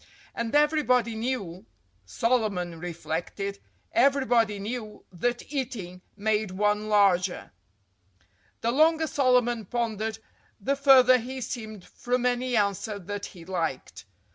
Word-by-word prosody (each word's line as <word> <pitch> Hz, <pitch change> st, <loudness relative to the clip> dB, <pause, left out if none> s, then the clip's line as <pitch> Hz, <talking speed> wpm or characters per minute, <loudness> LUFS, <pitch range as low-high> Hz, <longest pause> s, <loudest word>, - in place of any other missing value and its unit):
And 235 Hz, +3 st, -3 dB
everybody 290 Hz, -6 st, +3 dB
knew—Solomon 190 Hz, -, -3 dB
reflected—everybody 205 Hz, -, -1 dB
knew 215 Hz, +1 st, -6 dB
that 240 Hz, -, -3 dB
eating 215 Hz, -10 st, -4 dB, 0.2 s
made 215 Hz, 0 st, 0 dB
one 210 Hz, +3 st, 0 dB
larger. 195 Hz, -3 st, +2 dB, 1.1 s
The 230 Hz, -, +1 dB
longer 320 Hz, +4 st, +4 dB
Solomon 250 Hz, -5 st, +2 dB
pondered, 220 Hz, 0 st, -2 dB, 0.4 s
the 275 Hz, +8 st, 0 dB
farther 260 Hz, -2 st, +6 dB
he 260 Hz, +3 st, -6 dB
seemed 220 Hz, -5 st, -6 dB
from 250 Hz, 0 st, -2 dB
any 250 Hz, 0 st, 0 dB
answer 205 Hz, 0 st, 0 dB
that 200 Hz, +1 st, -6 dB
he 170 Hz, -3 st, -13 dB
liked. 165 Hz, -, -4 dB
220 Hz, 100 wpm, -27 LUFS, 195-250 Hz, 1.1 s, farther